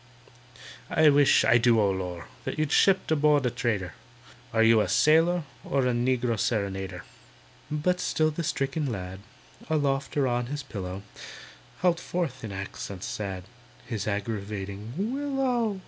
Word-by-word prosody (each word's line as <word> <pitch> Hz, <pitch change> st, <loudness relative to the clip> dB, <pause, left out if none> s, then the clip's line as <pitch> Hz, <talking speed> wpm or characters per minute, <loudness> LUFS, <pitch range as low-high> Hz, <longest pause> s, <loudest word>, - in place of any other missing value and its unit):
"I 155 Hz, -1 st, +5 dB
wish, 145 Hz, -1 st, +5 dB
I 120 Hz, -, +5 dB
do—O 115 Hz, -4 st, +4 dB
lor'!— 90 Hz, -3 st, -4 dB, 0.2 s
You'd 155 Hz, -1 st, -1 dB
shipped 190 Hz, -4 st, +3 dB
aboard 150 Hz, -2 st, +3 dB
a 125 Hz, -, +1 dB
trader: 105 Hz, -7 st, -2 dB, 0.6 s
Are 115 Hz, 0 st, +3 dB
you 115 Hz, -1 st, +6 dB
a -, -, -1 dB
sailor 160 Hz, -, +4 dB, 0.2 s
or 135 Hz, -1 st, 0 dB
A 125 Hz, -, +2 dB
negro 120 Hz, -2 st, 0 dB
serenader?" 95 Hz, -5 st, -2 dB, 0.7 s
But 170 Hz, +4 st, 0 dB
still 155 Hz, 0 st, +1 dB
the 165 Hz, +3 st, -4 dB
stricken 140 Hz, -1 st, -1 dB
lad, 95 Hz, -2 st, -6 dB, 0.5 s
Aloft 140 Hz, -3 st, 0 dB
or 140 Hz, -, +3 dB
on 120 Hz, -1 st, -1 dB
his 145 Hz, +1 st, -4 dB
pillow, 95 Hz, -3 st, -6 dB, 0.8 s
Howled 175 Hz, -1 st, +3 dB
forth 165 Hz, -9 st, -3 dB
in 110 Hz, -, -5 dB
accents 100 Hz, -1 st, -6 dB
sad 95 Hz, -3 st, -4 dB, 0.4 s
His 110 Hz, -5 st, -4 dB
aggravating 100 Hz, 0 st, -4 dB
"Willow!" 250 Hz, -2 st, -1 dB
125 Hz, 135 wpm, -27 LUFS, 100-155 Hz, 0.8 s, you